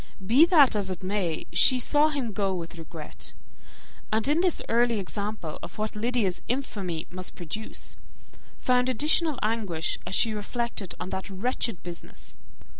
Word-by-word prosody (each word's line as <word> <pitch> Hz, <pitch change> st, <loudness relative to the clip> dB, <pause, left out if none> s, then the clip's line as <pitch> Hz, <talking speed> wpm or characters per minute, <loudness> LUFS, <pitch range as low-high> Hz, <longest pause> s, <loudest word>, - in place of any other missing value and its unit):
Be 260 Hz, -, +7 dB
that 300 Hz, -, +6 dB
as 200 Hz, -2 st, +1 dB
it 185 Hz, 0 st, -5 dB
may, 185 Hz, -4 st, -1 dB
she 250 Hz, +9 st, +6 dB
saw 295 Hz, +5 st, +4 dB
him 265 Hz, -7 st, -2 dB
go 195 Hz, -2 st, 0 dB
with 170 Hz, -1 st, -6 dB
regret; 160 Hz, -1 st, -8 dB, 0.8 s
and 220 Hz, +3 st, +2 dB
in 300 Hz, +4 st, +3 dB
this 360 Hz, -3 st, +2 dB
early 235 Hz, 0 st, +3 dB
example 200 Hz, -4 st, -4 dB
of -, -, -9 dB
what 215 Hz, 0 st, -2 dB
Lydia's 220 Hz, -4 st, 0 dB
infamy 200 Hz, -, -2 dB
must 185 Hz, 0 st, -5 dB
produce, 195 Hz, +6 st, -6 dB, 0.6 s
found 250 Hz, 0 st, +2 dB
additional 300 Hz, +4 st, +3 dB
anguish 210 Hz, -7 st, -1 dB
as -, -, -1 dB
she 225 Hz, -, +3 dB
reflected 215 Hz, -2 st, -3 dB
on 180 Hz, -, -4 dB
that 190 Hz, +2 st, -4 dB
wretched 205 Hz, 0 st, -2 dB
business. 175 Hz, -1 st, -8 dB
215 Hz, 150 wpm, -27 LUFS, 185-250 Hz, 0.8 s, Be